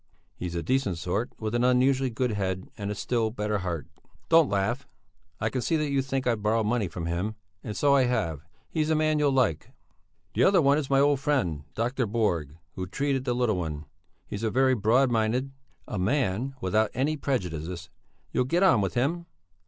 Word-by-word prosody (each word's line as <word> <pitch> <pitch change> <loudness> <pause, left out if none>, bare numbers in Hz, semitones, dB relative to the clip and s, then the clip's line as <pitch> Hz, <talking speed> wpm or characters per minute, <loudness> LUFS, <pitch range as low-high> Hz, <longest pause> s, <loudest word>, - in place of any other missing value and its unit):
He's 90 -1 -5
a 85 - -2
decent 130 -9 0
sort, 90 +8 -2
with 110 0 -3
an 120 0 +1
unusually 130 +1 +3
good 125 +1 -1
head 95 -3 -3
and 100 -1 -4
a 105 - -2
still 115 0 0
better 105 -2 -2
heart. 85 -5 -3 0.4
Don't 165 -2 +6
laugh, 100 +7 -1 0.5
I 110 +1 -1
can 130 - -1
see 165 - 0
that 150 -2 0
you 140 -1 +2
think 135 0 -2
I've 115 -3 +1
borrowed 110 +1 +1
money 110 -2 +1
from 85 -1 -6
him 90 +6 -2 0.3
and 105 - -5
so 145 -1 +4
I 135 -2 +5
have 85 - -1 0.3
he's 155 -1 -1
a 160 - +3
man 155 0 +2
you'll 145 -1 +3
like. 125 - +1 0.6
The - - +2
other 195 -1 +5
one 140 -1 +4
is 140 - -4
my 135 -1 +4
old 140 -1 +3
friend, 105 - 0
Dr. 125 +2 0
Borg, 85 -9 -1 0.2
who 95 -1 -5
treated 135 +5 -1
the 125 - 0
little 120 -5 +1
one. 80 -3 -4 0.4
He - - -5
is - - -7
very 130 +4 +3
broad 125 +4 +3
minded, 120 +4 0 0.4
a 105 - -3
man 125 +3 0
without 105 +3 +2
any 140 +5 +1
prejudices; 90 - -3 0.4
you'll 125 - +1
get 170 +8 +1
on 125 - +5
with 95 -3 -2
him! 165 +8 0
120 Hz, 200 wpm, -27 LUFS, 95-135 Hz, 0.6 s, Don't